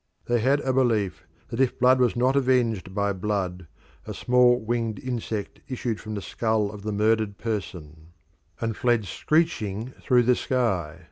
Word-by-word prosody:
They 120 0 +1
had 135 +5 +2
a 130 - 0
belief 115 -7 0 0.2
that 115 - -5
if 130 - +1
blood 130 +1 +4
was 125 -2 +2
not 130 +3 +2
avenged 120 -8 +1
by 100 -1 +1
blood 95 -3 -3 0.4
a - - -5
small 125 0 +4
winged 115 -1 -2
insect 115 -4 -4
issued 120 -4 -3
from 110 -1 -6
the 100 - -5
skull 110 +1 0
of 105 -1 -9
the 105 +1 -3
murdered 105 0 +1
person 85 -8 -5 0.5
and 115 -1 -2
fled 120 -3 +1
screeching 125 - -1
through 125 -2 +3
the 125 +1 +4
sky. 95 - -1
115 Hz, 160 wpm, -25 LUFS, 100-125 Hz, 0.5 s, blood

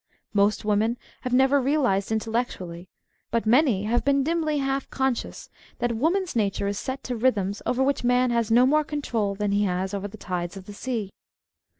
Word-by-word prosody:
Most 205 +1 +2
women 215 +3 +1 0.2
have 250 - -4
never 265 +2 +4
realised 250 -8 +1
intellectually, 220 -6 -3 0.4
but 230 -1 0
many 235 -3 +4
have 230 +3 +1
been 280 0 +3
dimly 315 -1 0
half 270 -1 -1
conscious, 265 -2 -2 0.3
that 240 -1 -1
woman's 345 - 0
nature 200 -3 0
is 200 0 -2
set 265 0 -5
to 250 - -3
rhythms 205 -5 0
over 255 +1 +2
which 275 -1 0
man 245 0 +3
has 235 -2 +1
no 240 +3 +6
more 305 +3 +3
control 235 -9 -2
than 205 0 -1
he 205 +1 +2
has 185 +1 -1
over 200 0 -3
the 205 - -11
tides 180 -1 -4
of 190 - -10
the 205 - -9
sea. 215 -2 -3
235 Hz, 185 wpm, -25 LUFS, 205-265 Hz, 0.4 s, no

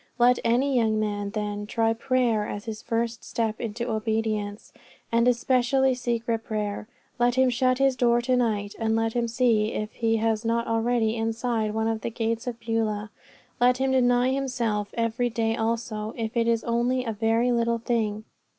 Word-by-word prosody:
Let 245 0 +4
any 255 +4 +2
young 220 -3 +2
man, 205 -1 -2
then, 205 0 -4
try 225 0 +1
prayer 230 -3 +1
as 205 +1 -6
his 220 -1 -6
first 230 0 -2
step 225 -2 -2
into 235 +1 -3
obedience, 215 -1 -2 0.4
and 230 +1 +3
especially 255 +2 +2
secret 235 -2 -2
prayer. 210 -1 -3 0.3
Let 240 0 +3
him 260 -1 +4
shut 255 +1 +2
his 270 -1 +3
door 240 -1 +3
to 255 +1 +1
night, 210 -4 0
and 225 -1 +1
let 225 0 0
him 240 -1 0
see 230 -2 +2
if 215 0 -3
he 225 -1 0
is 220 0 0
not 230 0 0
already 225 0 +1
inside 225 -1 -1
one 220 0 0
of 225 -1 -1
the - - -2
gates 230 +1 -2
of 240 -1 -4
Beulah. 225 -2 -2 0.5
Let 250 +1 +4
him 265 0 0
deny 245 -1 +3
himself 240 -6 -1
every 230 +1 0
day 225 -1 0
also, 225 -1 -2
if 225 0 -3
it 230 -1 +2
is 230 -1 +1
only 240 +2 0
in 235 - -4
a - - -1
very 225 +3 +1
little 235 -1 +1
thing. 220 -2 -1
230 Hz, 180 wpm, -26 LUFS, 220-245 Hz, 0.5 s, Let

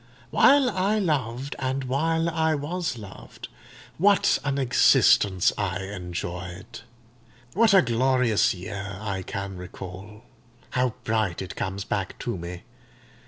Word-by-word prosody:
While 280 -2 +5
I 195 +3 +1
loved, 140 - -1
and 135 0 -2
while 160 +6 0
I 160 -1 +1
was 155 0 -3
loved, 100 -3 -11 0.5
what 200 +2 +4
an 140 -1 -1
existence 105 -7 +4
I 95 -4 -1
enjoyed! 90 -1 -6 0.7
What 220 +1 +4
a 190 - +7
glorious 125 -2 +2
year 100 0 -6
I 100 -3 -3
can 100 0 -5
recall—how 105 +7 -6
bright 110 -5 0
it 95 - -8
comes 95 +1 -3
back 100 -2 -3
to 120 - -4
me! 85 0 -7
115 Hz, 120 wpm, -25 LUFS, 95-145 Hz, 0.7 s, a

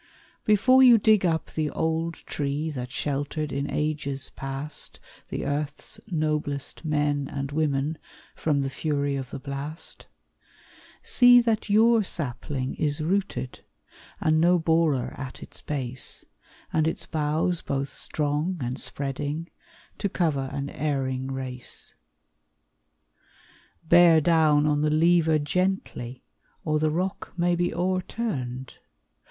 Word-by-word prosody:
Before 255 +5 +5
you 245 -3 +8
dig 215 -3 +4
up 160 -2 -1
the 155 -1 -1
old 160 +1 -1
tree 145 +2 -3
That 125 -3 -5
sheltered 145 +2 -2
in 140 +1 -2
ages 145 -3 -2
past 135 +2 -2 0.3
The - - -3
earth's 145 0 -3
noblest 150 -6 -2
men 145 -2 0
and 140 0 -4
women 150 0 0 0.4
From 145 -3 +1
the 135 0 -2
fury 145 0 -1
of 135 -2 -4
the - - -6
blast, 140 +4 -6 1.0
See 245 -1 +7
that 225 -3 0
your 225 +2 +5
sapling 135 -5 -3
is 150 0 0
rooted, 185 -6 -2 0.6
And 155 0 +2
no 175 +2 +5
borer 160 -5 +1
at 130 -1 -7
its - - -11
base, 130 -4 -3 0.5
And 160 0 +2
its 160 - -2
boughs 160 +3 0
both 135 0 -2
strong 150 +4 -1
and 125 0 -3
spreading, 145 +4 -3 0.5
To 200 - 0
cover 145 -8 0
an 140 0 -4
erring 130 -3 -2
race. 130 -2 -3 1.9
Bear 170 -1 +7
down 155 -2 +4
on 150 -1 +2
the 150 - +2
lever 160 0 +4
gently, 145 -6 -2 0.4
Or 155 -1 +1
the 155 0 +2
rock 180 +5 -3
may 175 0 +2
be 175 0 0
o'erturned! 175 - -3
150 Hz, 125 wpm, -26 LUFS, 140-170 Hz, 1.9 s, you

